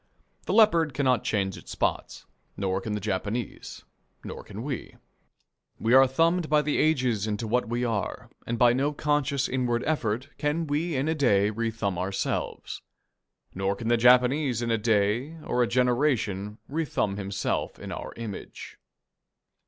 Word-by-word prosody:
The - - 0
leopard 170 - +4
cannot 130 -4 +2
change 95 -3 -1
its - - -13
spots, - - -2 0.3
nor 95 -1 -1
can 105 +1 -4
the 105 - -1
Japanese, 105 +3 -4 0.4
nor - - -7
can 105 +4 -8
we. 135 -3 -5 0.8
We 115 +2 +1
are 135 0 +8
thumbed 165 +5 +1
by 150 0 +4
the 150 0 0
ages 125 -9 +1
into 110 +1 -2
what 120 +1 0
we 120 +1 -1
are, 110 -4 -3 0.2
and 120 - -1
by 120 0 +5
no 140 +4 0
conscious 145 -2 0
inward 125 -2 0
effort 125 -6 -1
can 155 +2 0
we 155 +3 -1
in 135 +3 0
a 160 - +2
day 105 -9 +3
rethumb 110 -4 -2
ourselves. 95 +1 -3 0.7
Nor 95 +1 -1
can 115 +3 -4
the 120 - +5
Japanese 125 +1 +4
in 115 - -1
a 115 - +3
day, 110 +7 +1
or 125 - 0
a 120 - +3
generation, 120 -5 +1
rethumb 140 -10 -1
himself 100 -1 -2
in - - -8
our - - -6
image. 115 -4 -8
120 Hz, 155 wpm, -27 LUFS, 105-145 Hz, 0.8 s, are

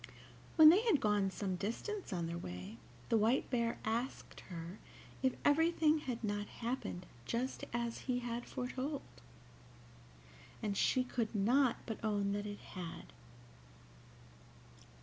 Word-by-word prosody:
When 315 -2 +11
they 365 +6 +7
had 440 - +3
gone 210 -3 +2
some 190 -1 -2
distance 360 - -3
on 175 -3 -1
their 170 +1 -3
way, 90 - -7 0.3
the 225 - +4
White 225 +5 +3
Bear 235 -2 +1
asked 235 +4 -2
her 170 +2 -6 0.4
if 260 -1 +2
everything 315 +1 +4
had 250 -5 -4
not 205 -1 -1
happened 230 -7 -4 0.2
just 250 +3 -2
as 235 -1 -2
he 250 - +3
had 240 -1 -3
foretold, 260 +3 -3 1.6
and 205 -2 0
she 255 +5 +3
could 235 -3 -2
not 245 +5 +4
but 225 -1 -5
own 205 -2 +1
that 205 +1 -2
it 205 0 -5 0.2
had. 175 -3 -7
230 Hz, 130 wpm, -36 LUFS, 200-260 Hz, 1.6 s, When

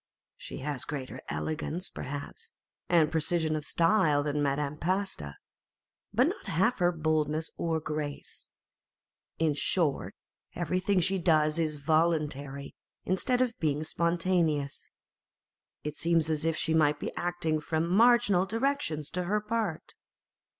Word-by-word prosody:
She - - -8
has 145 -2 -2
greater 135 -4 -5
elegance, 160 +3 -2
perhaps, 145 +1 -7 0.4
and 165 -3 +4
precision 160 0 +1
of 155 - -3
style 165 -3 +3
than 145 0 -1
Madame 145 +1 -1
Pasta, 185 - -2 0.8
but - - +3
not - - -5
half 190 +9 +1
her 175 0 +4
boldness 155 -1 0
or 165 -1 -1
grace. 150 -2 -5 0.9
In 160 -2 +2
short, 150 0 0 0.4
everything 185 +3 +1
she 190 +3 +1
does 155 -2 +3
is 155 -2 0
voluntary, 150 -2 0 0.3
instead 245 +7 +1
of 245 -1 -4
being 150 -1 0
spontaneous. 170 -4 0 0.9
It 150 0 -5
seems 165 -1 +2
as 155 0 -1
if 165 -1 +1
she 160 - +1
might 150 -2 +3
be - - -4
acting 175 -3 -1
from 160 +2 -1
marginal 210 -1 +4
directions 225 - -1
to 180 0 -2
her 210 +4 +1
part. 210 -6 -3
160 Hz, 130 wpm, -29 LUFS, 150-180 Hz, 0.9 s, and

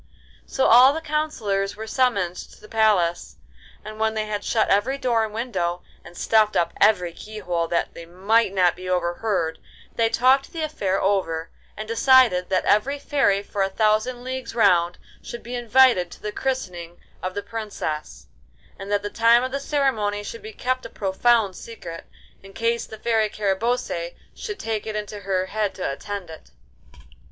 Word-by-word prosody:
So 265 - 0
all 255 +4 +7
the 320 - -3
counsellors 290 -11 -2
were 220 +1 -7
summoned 220 -7 +1
to - - -11
the - - -14
palace, 205 -7 +1 0.5
and 215 0 -8
when 220 0 +1
they 215 0 -1
had 210 -1 -4
shut 225 - +1
every 230 +8 +2
door 240 -4 +1
and 220 - -4
window, 185 -7 -3 0.2
and 175 - -13
stuffed 215 -1 +3
up 170 0 +1
every 180 -5 +3
keyhole 180 -5 -4
that 170 - -1
they 170 - -10
might 195 +5 +2
not 180 -3 +2
be 185 0 -7
overheard, 175 -1 -1 0.4
they 225 -1 +3
talked 260 +4 +3
the 325 -2 -3
affair 195 -11 -1
over, 165 -5 -1 0.3
and 215 +1 -6
decided 230 -5 +4
that 185 -1 +1
every 260 +8 +2
fairy 270 -9 +1
for 200 - -4
a 195 - +2
thousand 215 +4 +1
leagues 260 -1 -5
round 175 -6 +3 0.2
should 235 - -8
be 240 - -8
invited 240 -6 +4
to - - -13
the 210 - -3
christening 180 -11 -4 0.2
of 185 0 -4
the 205 - -3
Princess, 210 -9 -5 0.5
and 195 +1 -7
that 205 0 +1
the 205 - -4
time 230 +1 +4
of 260 - -3
the 275 - -2
ceremony 255 -8 0
should 230 +3 -7
be 215 - -8
kept 255 +3 -2
a - - -8
profound 205 +1 +1
secret, 175 -8 -9 0.4
in 195 0 -14
case 230 +2 -1
the 220 - -9
Fairy 220 -1 +1
Carabosse 200 -4 -2 0.2
should 420 -2 -6
take 220 -1 -3
it 215 - -4
into 210 0 -5
her 190 -2 -1
head 210 0 -2
to 185 - -6
attend 195 +3 -6
it. 160 - -13
215 Hz, 175 wpm, -23 LUFS, 185-235 Hz, 0.5 s, all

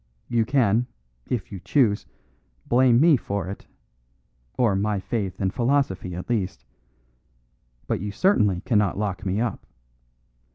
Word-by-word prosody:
You 115 -2 +1
can, 120 -2 +2 0.4
if 115 -7 -3
you 100 - -6
choose, 110 -2 +1 0.6
blame 125 -1 +4
me 155 -1 +6
for 100 -5 -4
it, 100 - -8 0.9
or 115 -6 +3
my 100 +1 0
faith 95 -2 -3
and 95 -1 -1
philosophy 120 -8 0
at 90 - -6
least; 105 -6 -2 1.2
but - - -1
you 105 - -3
certainly 105 - +2
cannot 105 -5 +1
lock 100 -3 -3
me 95 +3 0
up. 120 0 -3
105 Hz, 130 wpm, -24 LUFS, 95-120 Hz, 1.2 s, me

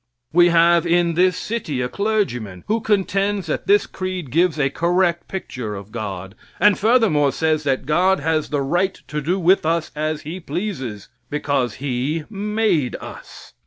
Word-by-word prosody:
We 175 +1 +6
have 170 0 +4
in 170 0 +2
this 180 +2 +3
city 205 - -3
a 125 - 0
clergyman 125 - -2
who 220 +1 0
contends 200 -1 0
that 155 - -3
this 205 +1 +4
creed 185 -7 -5
gives 165 0 +2
a 135 -1 +1
correct 175 +2 +1
picture 125 - -5
of 100 +1 -9
God, 95 -4 -5 0.3
and 205 -1 +5
furthermore 210 - +3
says 155 0 0
that 135 -2 0
God 180 +6 +2
has 155 +1 0
the 145 -2 0
right 175 +7 0
to 150 0 -3
do 175 +7 0
with 185 +2 +4
us 165 0 0
what 155 0 -2
He 165 +5 -6
pleases 145 - -5 0.2
because 140 -5 -1
He 140 +4 -2
made 205 - 0
us. - - -11
165 Hz, 160 wpm, -21 LUFS, 140-190 Hz, 0.3 s, We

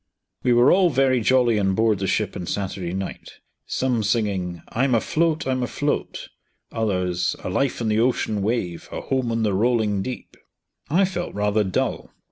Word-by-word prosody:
We 125 - +2
were 120 +1 +6
all 185 -1 +5
very 130 -3 +2
jolly 120 -2 +3
on 95 -1 +1
board 110 -1 +2
the 95 - -1
ship 105 0 0
on 90 - -5
Saturday 95 -3 -3
night, 95 +1 -6 0.3
some 125 -3 0
singing, 100 -5 -1
"I'm 130 +1 +1
afloat, 160 +7 +1
I'm 130 -1 0
afloat," 145 +4 -2 0.4
others, 90 -5 -1
"a - - -3
life 135 +7 0
on - - -1
the 110 0 +2
ocean 115 -3 +1
wave, 95 -5 -2
a - - -4
home 130 -3 -1
on 115 0 0
the 105 -2 +1
rolling 105 -1 +1
deep." 125 +5 -7 0.5
I 180 +6 +4
felt 175 - -4
rather 105 +1 +1
dull. 95 -2 -2
110 Hz, 170 wpm, -23 LUFS, 100-130 Hz, 0.5 s, were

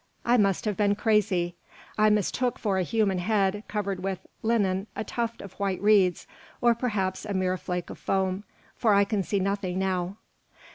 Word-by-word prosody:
I 240 - +4
must 200 -3 +2
have 210 -2 0
been 205 0 +2
crazy. 200 -5 +1 0.4
I 215 0 +4
mistook 210 +4 +1
for 195 -4 0
a - - +2
human 200 -1 +1
head 205 +1 +1
covered 200 -3 -2
with 190 -1 -3 0.2
linen 205 -3 +1
a - - -2
tuft 230 0 -3
of 195 - -10
white 195 -2 -1
reeds, 200 -4 +3 0.3
or 240 -1 +4
perhaps 205 -6 -2
a 205 -2 -4
mere 185 -1 +1
flake 180 -1 -4
of - - -10
foam, 190 0 0 0.3
for 215 -4 +3
I 200 - +6
can 200 0 0
see 200 +2 -1
nothing 195 -1 -1
now." 190 0 -1
200 Hz, 180 wpm, -27 LUFS, 185-215 Hz, 0.4 s, I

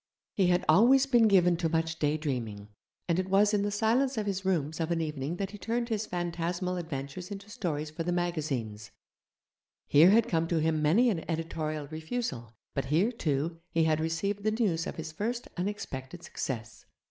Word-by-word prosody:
He 190 -3 +2
had 180 0 +2
always 260 +6 +6
been 240 -5 +5
given 180 -4 +4
to 165 -1 0
much 160 0 -1
daydreaming, 130 -9 -2 0.4
and 170 0 +1
it 185 0 -2
was 205 +2 +4
in 205 - +2
the 205 - 0
silence 230 +5 +1
of 215 - -1
his 195 -1 -2
rooms 160 -5 0
of 165 0 -1
an 170 -1 0
evening 150 -1 -3
that 195 +1 -3
he 205 - -10
turned 235 +4 -2
his 215 -1 -1
phantasmal 175 +1 -2
adventures 160 +1 -5
into 200 0 -8
stories 155 -7 -3
for 155 - -6
the 175 +2 -1
magazines; 145 - -2 1.0
here 155 +5 +6
had 225 +3 +5
come 165 -5 +1
to 170 - 0
him 155 0 +1
many 210 +12 +4
an 165 -6 -3
editorial 155 -2 -3
refusal, 155 - -4 0.2
but 135 - -2
here, 165 - +2
too, 165 - -2
he 165 - +2
had 155 -1 +2
received 165 +6 -1
the 215 - +2
news 210 -7 0
of - - -5
his 160 -1 -6
first 230 +8 -3
unexpected 175 -5 -5
success. 115 -4 -5
170 Hz, 185 wpm, -29 LUFS, 155-205 Hz, 1.0 s, always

